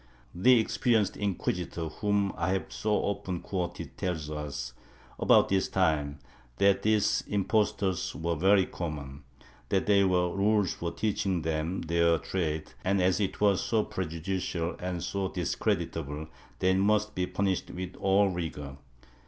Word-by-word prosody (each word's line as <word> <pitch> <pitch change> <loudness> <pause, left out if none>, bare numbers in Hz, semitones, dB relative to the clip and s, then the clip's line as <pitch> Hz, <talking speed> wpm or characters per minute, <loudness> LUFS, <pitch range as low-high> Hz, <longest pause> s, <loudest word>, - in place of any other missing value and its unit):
^ - - -28 0.3
The 120 +7 +5
experienced 110 -2 +1
inquisitor 90 -4 -2
whom 100 +3 0
I 90 +3 0
have 95 - -3
so 110 - -3
often 100 -3 -1
quoted 90 -2 -4
tells 80 -5 -2
us, 75 -4 -5 0.5
about - - +5
this 95 -1 +2
time, 75 -6 +1 0.4
that 100 0 +4
these 105 -1 +2
impostors 100 -2 0
were 85 +1 -1
very 95 +4 +4
common; 70 -4 -6 0.4
that 95 - +1
there 100 -2 +4
were 90 -1 +1
rules 100 -1 +2
for 85 -1 -4
teaching 95 -5 -1
them 80 +3 -1
their 85 0 +3
trade 80 -3 -3
and, 100 +1 +2
as 90 +1 +2
it 100 -3 -1
was 100 -2 +3
so 110 -2 +1
prejudicial 85 0 -3
and 90 -2 -3
so 100 -1 -1
discreditable, 80 -4 -2 0.3
they 95 0 +2
must 105 +2 +2
be 90 0 -1
punished 95 -2 -1
with 90 0 -6
all 100 +1 +3
rigor. 75 -6 -5
95 Hz, 145 wpm, -29 LUFS, 85-100 Hz, 0.5 s, The